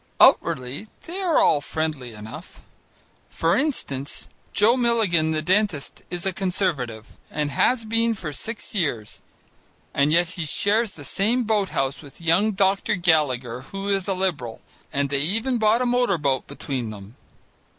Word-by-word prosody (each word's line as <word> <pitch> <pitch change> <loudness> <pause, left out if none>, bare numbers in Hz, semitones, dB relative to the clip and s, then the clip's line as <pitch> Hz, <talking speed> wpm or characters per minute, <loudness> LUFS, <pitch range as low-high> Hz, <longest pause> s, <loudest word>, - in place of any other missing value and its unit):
Outwardly, 125 +11 +3 0.2
they 365 +4 -3
are 350 -5 +2
all 145 - +4
friendly 150 -5 -3
enough. 105 +1 -10 0.7
For 165 +2 +1
instance, 145 - -2 0.2
Joe 220 +4 +4
Milligan 220 -10 +2
the 155 -1 -1
dentist 185 -5 0
is 175 +1 -3
a 190 - 0
Conservative, 160 - -2
and 150 -1 -2
has 230 - +2
been 230 +1 +1
for 160 -7 -6
six 230 +8 -5
years, 140 - -2 0.7
and 140 +2 +3
yet 170 +1 +3
he 175 -2 -5
shares 205 +7 +1
the 145 - -11
same 225 - +1
boat 210 -3 +1
house 135 +1 -1
with 140 -3 -14
young 175 +6 +3
Dr. 195 +3 +2
Gallagher, 135 -9 +1
who 195 +8 -6
is 195 -1 0
a 195 - 0
Liberal, 160 -12 -2 0.3
and 140 -1 0
they 140 -1 +1
even 225 - 0
bought 220 +3 +3
a - - 0
motor 245 -6 +2
boat 140 -4 0
between 135 -4 -4
them. 105 +1 -10
175 Hz, 155 wpm, -24 LUFS, 140-215 Hz, 0.7 s, all